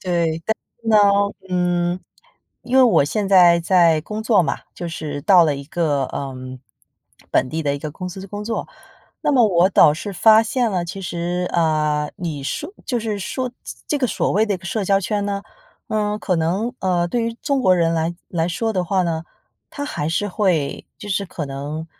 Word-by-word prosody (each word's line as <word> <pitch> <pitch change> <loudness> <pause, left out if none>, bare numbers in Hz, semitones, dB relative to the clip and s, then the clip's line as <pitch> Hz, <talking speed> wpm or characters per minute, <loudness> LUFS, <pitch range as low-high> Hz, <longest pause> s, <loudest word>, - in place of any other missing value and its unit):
对， 170 -3 -1
但 220 - +2 0.3
是 225 - -5
呢。 220 - +5 0.5
嗯， 175 0 0 0.6
因 250 +2 -1
为 265 - +8
我 230 - +5
现 200 +7 -2
在 175 -3 +6
在 170 -3 +4
工 210 +5 -5
作 215 -5 +4
嘛， 140 -4 -2 0.2
就 175 - -5
是 150 -3 -5
到 180 -2 +6
了 145 -3 +1
一 140 - -8
个， 150 -3 0
呃， 135 -2 -5 1.0
本 - - +2
地 160 +3 -3
的 140 -1 0
一 - - -4
个 155 +1 -5
公 180 +4 -6
司 190 +2 -8
工 205 +1 -6
作。 225 0 -3 0.5
那 - - +2
么 245 -4 +5
我倒 180 -4 +5
是 195 +5 -6
发 220 +4 +6
现 235 0 0
了， 180 -3 -1
其 195 +3 -7
实， 175 0 -2
呃， 150 -2 +1
你 160 -5 -4
说 145 - -4
就 245 -3 -1
是 215 -2 -3
说 255 +6 -3 0.2
这 - - -8
这 295 - 0
个 255 - +1
所 - - -1
谓 215 +3 +2
的 205 - 0
一 - - -2
个 180 - -17
社 200 +3 -2
交 195 +1 +3
圈 205 +1 -1
呢， 200 -1 -2 0.5
呃， 210 -1 0
可 185 -4 -1
能， 190 +9 0
呃， 175 -2 +1
对 235 +5 -1
于 230 0 -3
中 280 -2 +1
国 185 -6 +4
人 165 -1 +2
来 165 +1 -1
来 165 -1 -1
说 225 +6 -1
的 185 -2 0
话 185 +1 +1
呢， 165 -2 -2 0.5
它 285 - -5
还 155 - -3
是 205 +5 -1
会 180 -8 0
就 205 - -9
是 200 0 -1
可 155 -4 -5
能， 145 +4 -5
180 Hz, 220 characters per minute, -21 LUFS, 165-210 Hz, 1.0 s, 为